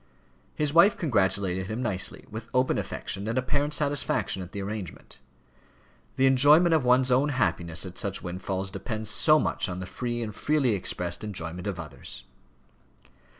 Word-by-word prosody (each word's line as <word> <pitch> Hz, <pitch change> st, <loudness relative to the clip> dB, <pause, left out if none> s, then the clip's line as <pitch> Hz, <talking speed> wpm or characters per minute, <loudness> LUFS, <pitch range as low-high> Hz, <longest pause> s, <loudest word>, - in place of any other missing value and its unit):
His 150 Hz, -1 st, -1 dB
wife 170 Hz, +6 st, +6 dB
congratulated 95 Hz, -, 0 dB
him 110 Hz, +5 st, -4 dB
nicely, 95 Hz, -6 st, -1 dB
with 110 Hz, +2 st, -7 dB
open 130 Hz, +1 st, +2 dB
affection, 100 Hz, +3 st, -5 dB
and 115 Hz, -, -2 dB
apparent 145 Hz, +3 st, 0 dB
satisfaction 145 Hz, -9 st, 0 dB
at 90 Hz, 0 st, -9 dB
the 100 Hz, -, -6 dB
arrangement. 100 Hz, -2 st, -7 dB, 1.0 s
The 135 Hz, -, +3 dB
enjoyment 145 Hz, +6 st, +6 dB
of 155 Hz, -4 st, +3 dB
one's 125 Hz, +1 st, +4 dB
own 135 Hz, +4 st, +3 dB
happiness 85 Hz, -, -1 dB
at 95 Hz, -1 st, -6 dB
such 100 Hz, -1 st, -3 dB
windfalls 95 Hz, +2 st, -4 dB
depends 110 Hz, +3 st, -4 dB
so 155 Hz, -1 st, +5 dB
much 130 Hz, -, -1 dB
on 90 Hz, 0 st, -5 dB
the 90 Hz, -, -5 dB
free 120 Hz, +4 st, -4 dB
and 105 Hz, -2 st, -5 dB
freely 145 Hz, 0 st, +1 dB
expressed 90 Hz, -2 st, -2 dB
enjoyment 90 Hz, -3 st, -4 dB
of 95 Hz, -3 st, -4 dB
others! 75 Hz, -5 st, -9 dB
110 Hz, 155 wpm, -27 LUFS, 95-130 Hz, 1.0 s, wife